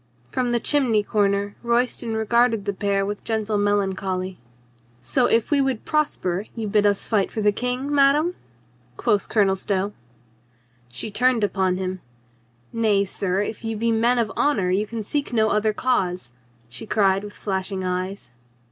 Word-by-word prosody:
From 250 -1 0
the 240 - +2
chimney 240 -6 +2
corner 200 -1 0
Royston 235 -1 0
regarded 225 -1 +2
the 200 - -1
pair 200 0 0
with 205 +1 -5
gentle 220 -2 -1
melan 205 -1 +1
choly. 185 -1 -4 0.6
"So 245 - +1
if 230 +4 +1
we 285 -1 +4
would 265 -4 -1
prosper 210 - -1
you 225 -2 -3
bid 210 0 +3
us 200 -1 +1
fight 205 -4 +1
for 220 - -4
the 210 0 +4
King, 250 +6 -2
madame?" 290 +5 +4 0.6
quoth 205 - +1
Colonel 200 -3 +3
Stow. 195 +1 -2 1.0
She 170 - -5
turned 245 +1 +2
upon 190 -2 +1
him. 185 -1 -4 0.7
"Nay, 210 -3 +2
sir, 190 0 -1
if 215 - -6
you 225 -1 -3
be 230 +2 +1
men 235 +2 +2
of 225 -4 0
honor 215 -11 +1
you 205 +3 +1
can 225 0 -5
seek 280 +4 -3
no 220 -2 +3
other 215 +1 +2
cause," 180 - -1 0.3
she 120 - -8
cried 195 -2 +2
with 205 0 -8
flashing 190 -1 -3
eyes. 185 -5 -4
210 Hz, 165 wpm, -23 LUFS, 195-235 Hz, 1.0 s, we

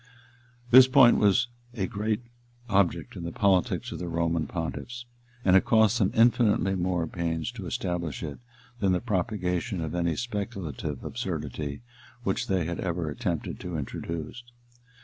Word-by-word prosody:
] 120 0 -27
This 130 +1 +10
point 130 -2 +6
was 105 +5 +4 0.3
a 100 -5 0
great 110 +2 -2 0.4
object 100 -4 +1
in - - -6
the 85 - -4
politics 95 0 +1
of - - -5
the 90 - -4
Roman 85 -1 0
pontiffs; 115 +8 -5 0.4
and 95 - +5
it 95 - +6
cost 110 +1 +4
them 95 -3 +3
infinitely 115 -4 +4
more 90 -2 0
pains 85 +2 -2
to 110 -7 -7
establish 85 -4 -3
it 75 -3 -6 0.4
than 95 -3 +2
the 90 - +2
propagation 95 -1 -1
of 80 -1 -3
any 85 -2 0
speculative 95 - -4
absurdity 75 - -4 0.4
which 95 -3 -1
they 95 -4 +1
had 85 +1 -3
ever 85 -3 -2
attempted - - -3
to 90 -2 -4
introduce. 80 - -5
95 Hz, 150 wpm, -27 LUFS, 85-110 Hz, 0.4 s, This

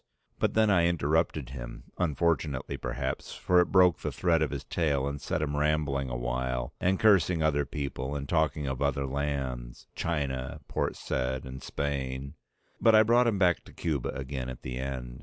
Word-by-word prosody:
But - - +1
then 110 -1 +4
I 85 -3 +4
interrupted 80 -4 0
him, - - -8
unfortunately 80 -4 0
perhaps, - - -4
for 90 0 +4
it - - -1
broke 90 -2 +5
the 75 - -3
thread 80 +3 +2
of 75 - +2
his 70 -2 -5
tale 70 -3 0
and 70 0 -4
set 75 - -1
him 75 -1 -2
rambling 75 -3 +1
a - - -3
while, 60 0 -2
and 95 +1 +2
cursing 90 -6 +4
other 75 -2 +2
people 70 -1 -4
and 70 -1 -4
talking 75 -1 +1
of 65 0 -3
other 70 -1 +1
lands, 65 -3 -3
China, 70 -6 -2
Port - - -1
Said 65 +1 -2
and 65 0 -8
Spain: 70 -1 -3 0.5
but 115 -1 +6
I 110 - +8
brought 120 +2 +4
him 110 -4 +2
back 90 -3 +3
to - - -14
Cuba 75 -7 -2
again 65 -2 -4
in 65 - -6
the 65 0 -4
end. 65 -2 -5
70 Hz, 180 wpm, -29 LUFS, 65-80 Hz, 0.5 s, I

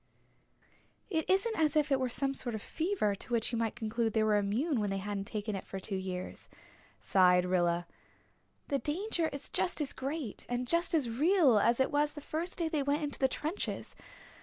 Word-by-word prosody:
"It 320 -3 -1
isn't 395 +4 +2
as 310 -1 +2
if 300 -1 +2
it 270 - +4
were 255 -1 0
some 275 +3 0
sort 240 -4 -3
of 215 - -5
fever 330 - 0
to 200 - -9
which 230 -1 +1
you 235 - -1
might 225 -1 -1
conclude 225 -1 -1
they 220 - +3
were 215 -1 +3
immune 230 +8 0
when 205 -1 0
they 195 - -1
hadn't 200 0 -3
taken 210 -1 -3
it 195 - -5
for 195 - -6
two 195 +1 -4
years," 185 -1 -5 0.5
sighed 180 -1 +4
Rilla. 175 -1 +1 0.8
"The 280 - +1
danger 340 +3 -1
is 280 -2 -5
just 355 - 0
as 295 -3 +2
great 275 -4 -4
and 245 +1 -1
just 340 +3 +1
as 290 -6 +2
real 280 - +4
as 235 +4 +3
it 265 - +2
was 295 0 +1
the 295 - -7
first 320 +4 -4
day 335 -3 0
they 315 -3 0
went 285 +3 0
into 290 -1 -3
the 265 - +4
trenches. 310 +8 -4
260 Hz, 205 wpm, -32 LUFS, 210-310 Hz, 0.8 s, it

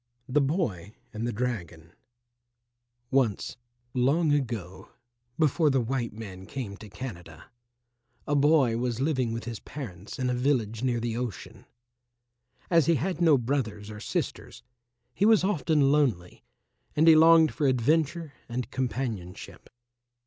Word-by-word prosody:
THE 145 +3 +2
BOY 125 - -1 0.2
AND 110 +2 -3
THE - - -1
DRAGON 90 -9 -4 1.2
Once, 130 -6 +1 0.4
long 145 +6 +2
ago, 115 -10 -3 0.5
before 155 0 +3
the 135 -1 +2
white 120 0 -2
man 95 -4 -9
came 110 -5 -5
to 105 - -11
Canada, 85 - -9 0.7
a 145 - 0
boy 140 -5 +4
was 120 -1 -2
living 130 -4 0
with 115 0 -4
his 115 -1 -6
parents 105 - -8
in 130 - -1
a 125 - +1
village 120 -4 0
near 125 -2 0
the 115 -1 -2
ocean. 120 -6 -6 1.0
As 165 -4 +4
he 170 - +4
had 175 +4 -2
no 160 -4 +6
brothers 110 -5 -2
or 105 - -8
sisters, - - -4 0.5
he - - -1
was 220 -4 +5
often 155 -6 +2
lonely, 125 -13 0 0.5
and 155 +2 +4
he 165 - +10
longed 160 0 +6
for 145 - 0
adventure 150 +5 +1 0.2
and 125 +2 -4
companionship. 120 -8 -4
125 Hz, 135 wpm, -27 LUFS, 110-145 Hz, 1.2 s, he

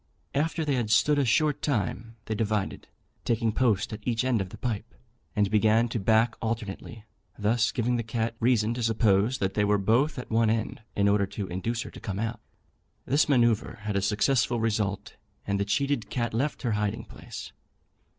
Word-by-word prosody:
After 160 +2 0
they 145 - +1
had 120 -5 0
stood 145 +6 +4
a 140 - +2
short 145 +6 +2
time 115 - -2
they 110 - -2
divided, 105 -2 -2 0.4
taking 115 -1 +1
post 110 -3 +1
at 105 - -5
each 120 +2 -1
end 125 -5 +2
of 95 - -4
the - - -10
pipe, 115 -1 -4 0.4
and 105 -1 +2
began 110 +2 +4
to 115 - -2
back 110 +3 +3
alternately, 110 -1 -4 0.3
thus 110 +2 +2
giving 120 0 0
the - - 0
cat 115 0 -2
reason 115 -2 +2
to 120 - -4
suppose 110 +1 +2
that 95 0 -1
they 105 - +1
were 105 0 +3
both 120 +9 +2
at 125 - -7
one 115 0 +3
end, 110 -1 -1
in 100 0 +3
order 100 -1 +3
to 100 +1 -5
induce 110 +6 -2
her - - -9
to - - -11
come 95 -3 -4
out. 115 +2 -2 0.7
This 145 +3 +2
manoeuvre 120 -6 +2
had 105 -1 -3
a 100 - +2
successful 115 +4 +2
result, 105 -2 -1 0.3
and 100 -1 -1
the 100 - +1
cheated 135 +4 0
cat 120 -3 -2
left 140 +7 -1
her 120 - 0
hiding 105 -1 -1
place. - - -9
110 Hz, 190 wpm, -27 LUFS, 105-120 Hz, 0.7 s, stood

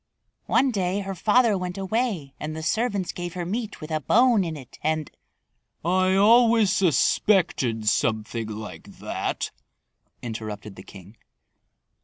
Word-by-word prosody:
One 270 -1 +3
day 195 -2 -1
her 195 0 -4
father 215 +4 +3
went 180 -1 -4
away 195 - -2
and 155 +1 -5
the 160 - -6
servants 205 +1 0
gave 175 0 -6
her 175 -1 -3
meat 215 +3 -4
with 155 +1 -8
a 155 - 0
bone 235 - +4
in 165 -3 -4
it 130 -4 -13
and 155 -1 -1 0.4
" - - -28
"I 185 +2 +2
always 225 0 +5
suspected 155 - +2
something 110 +1 0
like 110 0 -9
that," - - -3 0.7
interrupted 110 -3 -6
the - - -10
king. 95 +3 -14
180 Hz, 140 wpm, -25 LUFS, 125-210 Hz, 0.7 s, always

